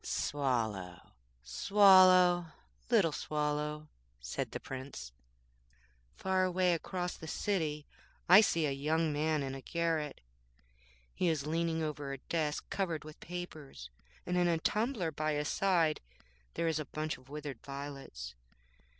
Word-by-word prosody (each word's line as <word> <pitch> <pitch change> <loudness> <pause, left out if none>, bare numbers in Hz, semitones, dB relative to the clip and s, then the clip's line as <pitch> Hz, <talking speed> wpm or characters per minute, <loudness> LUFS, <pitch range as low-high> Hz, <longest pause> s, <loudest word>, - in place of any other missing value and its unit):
'Swallow, 110 -11 -2 0.3
Swallow, 185 - +6 0.4
little 205 -9 +4
Swallow,' 150 0 -2 0.3
said - - -4
the - - -5
Prince,'far - - -6
away 185 -1 +2
across 180 +1 -3
the 160 - -10
city 155 -5 -1 0.4
I 185 +4 +9
see 170 -6 +2
a 145 - 0
young 155 +3 0
man 155 0 0
in 135 -1 -4
a 135 - -7
garret. 165 -1 -1 0.9
He 180 - 0
is 155 -3 -1
leaning 165 +1 0
over 150 -2 -4
a - - -5
desk 150 +2 -2
covered 170 -6 -1
with 155 0 -11
papers, 155 - -8 0.3
and 180 0 -1
in 175 0 +3
a 170 -1 +2
tumbler 210 0 0
by 155 0 -1
his 150 +1 -1
side 170 -6 +2 0.5
there 170 - 0
is 160 -1 0
a 155 - -3
bunch 155 +1 -4
of 130 +1 -21
withered 145 -4 -6
violets. 140 - -7
155 Hz, 135 wpm, -33 LUFS, 135-175 Hz, 0.9 s, I